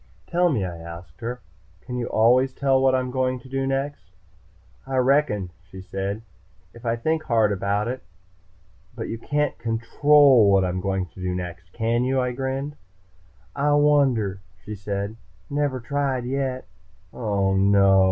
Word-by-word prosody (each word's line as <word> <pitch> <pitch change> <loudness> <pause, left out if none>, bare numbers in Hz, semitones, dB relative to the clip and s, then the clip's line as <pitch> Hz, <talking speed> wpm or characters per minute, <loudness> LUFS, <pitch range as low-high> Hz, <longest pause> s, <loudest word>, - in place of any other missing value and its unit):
"Tell 175 +1 +2
me," 110 - 0
I 85 -2 -6
asked 85 +5 -11
her. 120 +2 -4 0.4
"Can 125 - -7
you 120 -1 -2
always 125 +4 +3
tell 135 -1 +2
what 135 -1 +4
I'm 125 -1 -1
going 130 0 0
to 130 - -14
do 135 +1 -2
next?" 135 -7 -3 0.8
"I 135 -1 -2
reckon," 125 -8 +2 0.2
she 95 - -10
said. 95 +3 -4 0.5
"If 120 0 -9
I 115 - +2
think 160 +7 0
hard 110 -3 +3
about 100 +2 0
it." 130 +2 -4 0.9
"But - - -5
you 115 - -4
can't 150 +3 -1
control 120 +1 +4
what 95 -1 +4
I'm 90 0 -2
going 95 -1 -1
to 95 - -13
do 90 0 -2
next, 90 0 -7
can 115 +2 0
you?" 130 +1 +1
I 125 -1 0
grinned. 135 +3 -3 0.8
"I 145 +1 +2
wonder," 135 -9 +3 0.3
she 105 - -6
said. 100 +1 -4 0.3
"Never 145 -2 0
tried, 135 0 -1
yet." 130 0 -2 0.5
"Oh, 100 -4 0
no!" 100 0 +5
120 Hz, 160 wpm, -24 LUFS, 100-135 Hz, 0.9 s, no